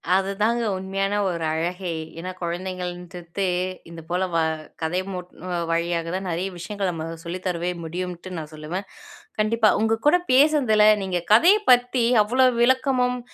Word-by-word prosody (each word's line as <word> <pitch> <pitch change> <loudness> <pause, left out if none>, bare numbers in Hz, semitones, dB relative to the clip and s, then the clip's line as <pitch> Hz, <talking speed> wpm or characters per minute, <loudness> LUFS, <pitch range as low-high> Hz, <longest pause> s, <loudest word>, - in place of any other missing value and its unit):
அதுதாங்க 205 +5 +1
உண்மையான 195 +2 -1
ஒரு 170 -3 -2
அழகே. 175 +3 -2 0.3
ஏன்னா 185 +2 -5
குழந்தைகளின்டுத்தே 180 +1 -4 0.4
இந்தப்போல 170 +2 -3
வ - - +2 0.4
கதை 170 +3 0
மூட் 180 -1 -7 0.4
வழியாகதான் 170 +2 -1
நிறைய 175 +3 -2
விஷயங்கள 195 +3 -3
நம்ம 160 -2 -5 0.2
சொல்லித்தருவே 180 0 -3
முடியும்னுட்டு 180 +2 -5
நான் 155 -1 -7
சொல்லுவேன் 160 +6 -5 0.5
கண்டிப்பா. 215 +1 +3
உங்க 225 0 +1
கூடப் 355 +3 +3
பேசுனதுல 255 -7 +5 0.2
நீங்க 185 -2 -1
கதையப் 385 - +5
பத்தி 245 0 +4 0.2
அவ்ளோ 255 +5 +3
விளக்கமும் 250 0 +2
185 Hz, 120 wpm, -23 LUFS, 175-225 Hz, 0.5 s, பேசுனதுல